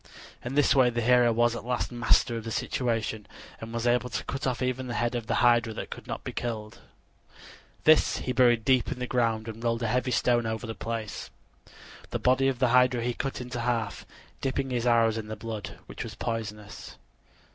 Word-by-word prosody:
In 125 +3 -4
this 145 -1 +4
way 130 -3 +5
the 120 0 -2
hero 125 0 +5
was 120 +1 +2
at - - -6
last 125 +1 -2
master 120 0 +2
of 115 - -4
the 115 - -5
situation 110 -2 -2 0.3
and 115 0 -8
was 115 0 -3
able 125 +1 +2
to - - -3
cut 135 -1 -3
off 125 - -1
even 130 0 -2
the 120 - -4
head 120 +2 0
of 120 -2 -3
the - - 0
hydra 120 -2 +4
that - - -6
could - - -8
not - - -5
be - - -5
killed. 110 -3 -5 1.0
This 155 0 +5
he 125 - -3
buried 120 -3 +4
deep 130 -3 +3
in - - -3
the 125 - -3
ground 115 -3 0
and 115 +1 -7
rolled 115 0 0
a - - +1
heavy 125 +3 0
stone 120 -1 +2
over 110 +1 -3
the 115 - -4
place. 115 -2 -5 0.8
The - - -2
body 130 +1 +3
of 135 -2 0
the 130 -1 +2
hydra 125 -1 +4
he 120 0 0
cut 135 +1 -4
into 125 -1 -5
half, 115 -3 -2 0.3
dipping 135 0 -1
his 120 -1 0
arrows 115 -2 +3
in 110 - -7
the 110 - -5
blood, 110 -1 -6
which - - -7
was 110 -2 -8
poisonous. 105 -3 -5
120 Hz, 210 wpm, -28 LUFS, 115-125 Hz, 1.0 s, way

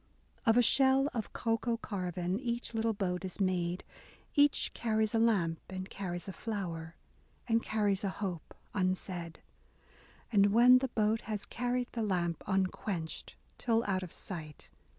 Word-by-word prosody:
Of 225 +1 +6
a 245 - +6
shell 270 +3 +5
of 225 -3 -3
cocoa 230 0 0
carven, 180 -3 -2
Each 240 -2 -3
little 225 0 +1
boat 180 -3 -1
is 185 +1 -4
made; 180 -2 0 0.5
Each 290 0 +3
carries 220 -1 0
a 225 - +3
lamp, 190 -8 +2
and 185 0 -6
carries 175 -3 -4
a 195 - -5
flower, 170 -6 -4 0.5
And 230 -1 +3
carries 205 -3 +1
a 200 - +1
hope 190 -4 -5 0.2
unsaid. 185 -3 -2 0.9
And 200 -2 +5
when 250 +2 +8
the 265 - -1
boat 220 -2 +1
has 210 -2 -2
carried 245 +1 -1
the 230 - -3
lamp 175 -5 0
Unquenched, 190 -3 -2 0.2
till 230 -1 +2
out 190 -2 0
of 180 -3 -7
sight. 155 -5 -8
200 Hz, 150 wpm, -32 LUFS, 180-230 Hz, 0.9 s, when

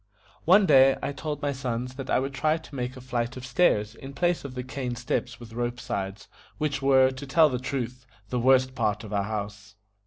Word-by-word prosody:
One 190 +5 +6
day 135 -4 +6
I - - -1
told 145 +1 -5
my 145 - +1
sons 125 -2 -3
that 135 0 -7
I - - +3
would 135 +1 -2
try 155 +3 +1
to 160 -2 -14
make 125 0 -4
a - - -9
flight 125 0 -3
of 130 - -7
stairs 120 -6 +2
in 135 +3 -10
place 175 +3 +1
of 135 -2 -7
the 125 - -3
cane 130 -1 -4
steps 120 0 -3
with 115 -2 -11
rope 120 +1 -2
sides, 100 -2 -4 0.3
which 145 -3 -1
were, 130 -1 +5
to 130 +2 -8
tell 155 +2 +5
the 125 -2 -2
truth, 125 -1 -4 0.2
the 125 - -1
worst 130 +1 +4
part 110 -3 -1
of 105 -1 -8
our 100 - +2
house. 105 -1 -6
130 Hz, 220 wpm, -26 LUFS, 120-140 Hz, 0.3 s, One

